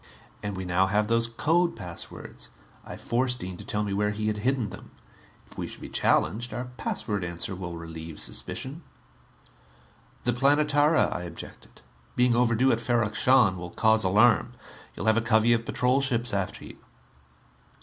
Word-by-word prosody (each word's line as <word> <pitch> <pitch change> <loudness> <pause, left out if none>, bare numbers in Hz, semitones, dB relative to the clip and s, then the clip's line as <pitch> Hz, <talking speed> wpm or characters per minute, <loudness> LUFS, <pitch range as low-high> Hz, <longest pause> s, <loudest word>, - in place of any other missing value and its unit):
And 100 -2 -4
we 95 - -4
now 90 +2 +2
have 105 +2 +2
those 115 +1 +2
code 165 +9 +1
passwords 90 -2 -8 0.3
I - - -9
forced 125 +1 -1
Dean 90 0 -5
to - - -9
tell 105 0 -2
me 100 -1 -2
where 105 +1 +1
he 105 +1 -3
had 105 0 0
hidden 120 -1 0
them. - - -11 0.6
If - - -13
we - - -3
should - - -8
be - - -8
challenged, 120 +4 +1
our 125 +1 -3
password 105 -6 -3
answer 85 +2 -3
will 90 -2 -6
relieve 80 -1 -8
suspicion." 140 +6 -5 1.4
"The 120 - +1
Planetara," 145 +4 +3
I - - -4
objected, 85 -1 -10 0.3
"being 125 -1 +3
overdue 125 +2 +3
at 115 - 0
Ferrok 115 -2 +1
Shahn, 115 -6 +4
will 90 0 -6
cause 110 +3 +3
alarm. 105 +4 +4 0.4
You'll - - -5
have 110 0 +4
a - - +3
covey 110 +1 +4
of 115 -1 -1
patrol 125 +2 +2
ships 120 -4 0
after 100 -2 -3
you." - - -11
110 Hz, 170 wpm, -27 LUFS, 95-125 Hz, 1.4 s, Shahn